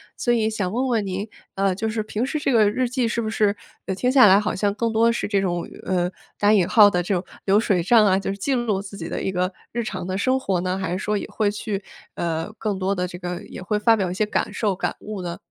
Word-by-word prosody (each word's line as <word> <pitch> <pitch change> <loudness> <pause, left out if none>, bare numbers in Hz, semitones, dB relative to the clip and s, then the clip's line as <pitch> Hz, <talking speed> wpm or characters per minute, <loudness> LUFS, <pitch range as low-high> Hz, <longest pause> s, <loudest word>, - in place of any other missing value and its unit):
所 240 - 0
以 225 -2 +2
想 205 -4 -2
问 255 +4 0
问 225 -4 +1
您， 195 +3 -3 0.3
呃， 195 -1 +1
就 220 +4 -2
是 215 -1 -2
平 215 +2 -3
时 290 +4 -1
这 285 -2 0
个 215 -3 +5
日 250 +4 0
记 250 -1 0
是 235 - -1
不 220 -1 -2
是 210 -2 +2 0.3
呃， 190 - -1
听 250 +6 +1
下 255 -6 +7
来 195 +2 +7
好 210 - -1
像 200 +1 0
更 230 0 -1
多 230 +1 +4
是 230 - -2
这 200 -2 +1
种， 175 -3 -2 0.2
呃， 180 -1 +1 0.3
打 205 +1 +4
引 190 -5 +4
号 210 -3 +7
的 180 -3 +1
这 185 +2 -1
种 175 - -2 0.2
流 200 +2 +4
水 195 -6 +1
账 215 +4 +5
啊， 190 -1 +3
就 195 - -4
是 200 - -5
记 270 +7 -1
录 230 -6 0
自 200 0 -8
己 165 -3 -6
的 - - -3
一 190 - -1
个 180 +1 0 0.2
日 235 0 -2
常 185 -4 -5
的 185 +1 -2
生 260 +4 +2
活 190 -8 -1
呢？ 185 +1 -1
还 185 -3 -3
是 185 - -1
说 210 0 -1
也 - - -5
会 210 -2 0
去 205 -1 -4 0.3
呃， 165 +3 -2
更 210 -3 -1
多 190 +1 0
的 180 -1 -1
这 175 - -8
个 180 -1 -5
也 - - -9
会 210 +2 -1
发 225 +1 +5
表 190 -4 -1
一 - - -3
些 205 +4 0
感 210 - -2
受、 205 -4 0
感 - - -2
悟 210 -3 -6
呢？ 170 0 -4
205 Hz, 300 characters per minute, -23 LUFS, 185-220 Hz, 0.3 s, 下